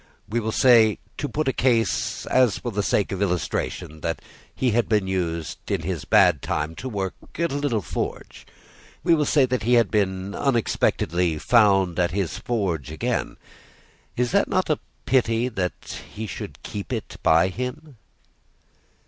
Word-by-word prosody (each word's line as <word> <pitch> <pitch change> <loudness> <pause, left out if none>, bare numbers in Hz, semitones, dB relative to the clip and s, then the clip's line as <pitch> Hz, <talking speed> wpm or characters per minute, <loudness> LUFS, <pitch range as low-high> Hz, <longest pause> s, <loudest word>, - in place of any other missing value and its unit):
We 115 +3 -1
will 110 -1 -2
say, 115 -3 +5 0.2
to 145 - -2
put 155 0 -2
a 135 - +2
case 115 -3 +1
and 130 -3 +4
for 120 +4 -4
the 105 0 -1
sake 100 0 +1
of 95 0 -3
illustration, 85 -4 -2
that 80 +1 -2 0.4
he 130 -2 +1
had 115 +1 +1
been 105 -3 +2
used, 85 -4 -3
in - - 0
his 85 -4 -3
bad 90 -9 +4
time, 75 +2 -2
to 130 - -5
work 95 -5 -3 0.2
at 170 -1 0
a - - -2
little 140 -8 0
forge. - - -5 0.6
We 170 - +4
will 150 -2 +2
say 140 -4 +4
that 125 -1 -1
he 120 +3 +3
was 115 - +5 0.5
unexpectedly 90 - +1
found 95 -4 +3
at 90 -1 +3
his 95 -1 -2
forge 90 - -2
again. 80 - -2 0.8
Is 125 0 0
it 200 - +3
not 185 -4 +1
a 150 - +1 0.3
pity 120 -2 +2
that 95 -6 -4
he 110 - -5
should - - -8
keep 100 +3 -6
it 115 -4 -4
by 80 +3 +4
him?" 125 - -6
110 Hz, 165 wpm, -24 LUFS, 90-125 Hz, 0.8 s, say